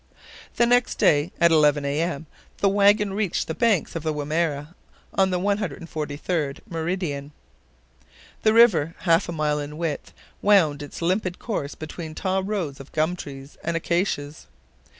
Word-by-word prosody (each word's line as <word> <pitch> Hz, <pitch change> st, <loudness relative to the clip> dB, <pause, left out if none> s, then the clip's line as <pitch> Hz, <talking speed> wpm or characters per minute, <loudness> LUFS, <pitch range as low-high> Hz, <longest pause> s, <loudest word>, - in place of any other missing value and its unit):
The 235 Hz, -, +4 dB
next 245 Hz, +1 st, +3 dB
day, 150 Hz, +3 st, +3 dB
at 170 Hz, -1 st, +5 dB
11 150 Hz, -2 st, +4 dB
A. 140 Hz, +3 st, 0 dB
M., 165 Hz, -3 st, -2 dB, 0.3 s
the 200 Hz, -, +3 dB
wagon 200 Hz, 0 st, +4 dB
reached 200 Hz, -3 st, -1 dB
the 160 Hz, -, -2 dB
banks 215 Hz, -5 st, +1 dB
of 165 Hz, -, -2 dB
the 155 Hz, 0 st, -1 dB
Wimerra 150 Hz, +1 st, -2 dB, 0.4 s
on 190 Hz, -1 st, +3 dB
the 180 Hz, -1 st, 0 dB
143d 160 Hz, -5 st, -2 dB
meridian. 160 Hz, -4 st, -3 dB, 1.1 s
The 215 Hz, -, +4 dB
river, 185 Hz, -9 st, +5 dB
half 165 Hz, 0 st, +3 dB
a -, -, -1 dB
mile 150 Hz, -2 st, 0 dB
in 145 Hz, +1 st, -6 dB
width, 165 Hz, -3 st, -3 dB, 0.3 s
wound 165 Hz, -8 st, +4 dB
its 145 Hz, +3 st, -7 dB
limpid 185 Hz, +1 st, 0 dB
course 150 Hz, -11 st, -4 dB
between 155 Hz, 0 st, -7 dB
tall 190 Hz, 0 st, 0 dB
rows 190 Hz, -9 st, -3 dB
of 135 Hz, -, -11 dB
gum 160 Hz, +3 st, +1 dB
trees 140 Hz, -4 st, -10 dB
and 170 Hz, 0 st, -1 dB
acacias. 165 Hz, -4 st, -2 dB
165 Hz, 150 wpm, -24 LUFS, 150-190 Hz, 1.1 s, at